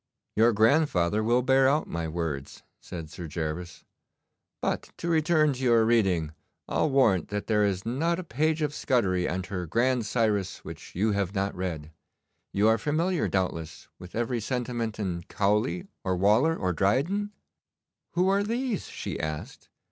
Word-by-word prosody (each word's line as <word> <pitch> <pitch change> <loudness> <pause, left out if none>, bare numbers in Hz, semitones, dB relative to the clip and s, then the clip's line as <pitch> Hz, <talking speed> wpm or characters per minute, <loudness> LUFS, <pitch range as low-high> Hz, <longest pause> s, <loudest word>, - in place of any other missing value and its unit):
'Your 115 +2 +5
grandfather 110 - +3
will 120 +3 +3
bear 130 +1 +4
out 150 +3 +1
my 85 -1 -3
words,' 80 -4 -4 0.2
said 80 -3 -8
Sir 85 0 -7
Gervas. 85 +2 -5 0.7
'But - - -2
to - - -5
return 155 -2 +3
to 130 0 -6
your 115 -3 +4
reading, 95 -9 +2 0.3
I'll 155 - +1
warrant 115 - +3
that 105 +1 -3
there 105 -2 +2
is 95 -2 0
not 160 +9 0
a 185 - -4
page 155 +2 0
of 145 -1 -1
Scudery 95 -12 +1
and 90 +1 -2
her 90 -3 -4
"Grand 120 +4 +1
Cyrus" 105 -5 0
which - - -10
you 105 +5 +2
have 100 -1 -1
not 100 +1 0
read. 80 -4 -4 0.6
You 100 +2 +3
are 110 0 +4
familiar, 165 - 0
doubtless, 80 -4 -3
with 90 0 -11
every 120 +1 -1
sentiment 120 -1 -2
in 90 -5 -2
Cowley, 105 - +1 0.2
or 95 -1 0
Waller, 110 - +4
or 90 -2 -1
Dryden?' 145 - +1 0.8
'Who 180 +2 +2
are 195 +1 +3
these?' 230 +1 -2
she - - -5
asked. 75 -1 -5
110 Hz, 160 wpm, -27 LUFS, 90-140 Hz, 0.8 s, Your